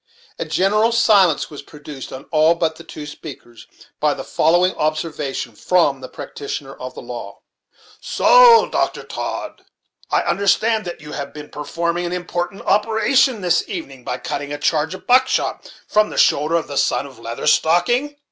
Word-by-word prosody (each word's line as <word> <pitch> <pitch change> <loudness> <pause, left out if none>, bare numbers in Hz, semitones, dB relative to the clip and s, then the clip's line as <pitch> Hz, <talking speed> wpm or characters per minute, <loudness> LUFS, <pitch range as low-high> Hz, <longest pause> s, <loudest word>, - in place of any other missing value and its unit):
A - - -2
general 210 +4 +2
silence 200 -10 +3
was 145 - -8
produced 145 -2 -10
on 130 +1 -8
all 155 +2 +4
but 160 -1 -1
the 165 - -11
two 155 -2 -9
speakers, 125 -6 -11 0.3
by 150 -1 +1
the 135 - -6
following 175 +6 +2
observation 150 -5 -3
from 145 0 +1
the 130 - -8
practitioner 140 -1 -7
of 130 -1 -9
the - - -9
law: 120 0 -8 0.6
"So, - - +6
Dr. - - -1
Todd, - - -5 0.5
I - - +1
understand 215 +2 +1
that 175 -3 -7
you 150 - -10
have 140 0 -6
been 150 0 -9
per 150 - -7
forming 170 +2 -2
an 175 - -4
important 175 +2 -4
operation 220 +3 +2
this 175 -1 +2
evening 140 -8 -7
by 125 - -3
cutting 145 +2 -5
a 145 - -3
charge 155 +3 0
of - - -13
buckshot 255 +1 +1 0.2
from 215 0 +2
the - - -8
shoulder 150 +3 +3
of 165 - 0
the 140 - -1
son - - +1
of 135 -4 -13
Leather 115 0 -6
Stocking?" 240 - +2
165 Hz, 170 wpm, -20 LUFS, 145-195 Hz, 0.6 s, So